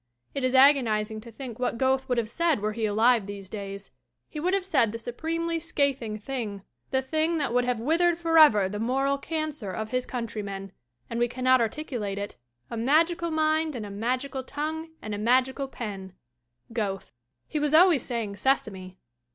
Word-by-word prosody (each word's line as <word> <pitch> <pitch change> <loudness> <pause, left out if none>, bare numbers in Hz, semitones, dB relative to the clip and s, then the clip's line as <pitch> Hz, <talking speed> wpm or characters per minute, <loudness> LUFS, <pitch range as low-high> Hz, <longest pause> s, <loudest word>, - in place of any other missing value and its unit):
It 275 - -3
is 255 0 +1
agonizing 225 -6 +4
to 235 +1 -12
think 245 0 -8
what 250 -2 -1
Goethe 265 +1 +1
would 250 - +1
have 230 -2 0
said 325 +2 +1
were 215 +1 -2
he 220 0 -1
alive 220 0 +3
these 200 -1 -7
days. 200 -1 -7 0.4
He 305 - -7
would 365 +5 +1
have 390 -2 -1
said 230 - +3
the 230 - -4
supremely 330 +8 -2
scathing 275 -9 -1
thing, 215 -4 -5 0.3
the 265 0 +1
thing 315 +4 0
that 280 -6 -1
would 245 0 +2
have 250 -2 0
withered 330 +7 +2
forever 315 - +5
the 205 +2 -5
moral 270 +4 +1
cancer 310 - -3
of 215 +3 -5
his 255 0 -1
countrymen, 205 -5 -5 0.4
and 230 - -4
we 240 - +3
cannot 255 +1 +3
articulate 225 -5 -3
it 205 0 -5 0.4
A 230 - -3
magical 330 +8 +2
mind 315 -1 +1
and 220 -3 -4
a 205 - -8
magical 255 +6 -2
tongue 310 +4 -4
and 215 - -4
a 205 - -3
mag 250 +4 +4
ical 270 +1 -6
pen 195 -5 -6 0.6
Goethe. 200 -4 -3 0.4
He 305 - -2
was 295 +1 +2
always 340 -5 +6
saying 225 -5 -3
sesame. 190 -6 -1
250 Hz, 185 wpm, -27 LUFS, 215-300 Hz, 0.6 s, always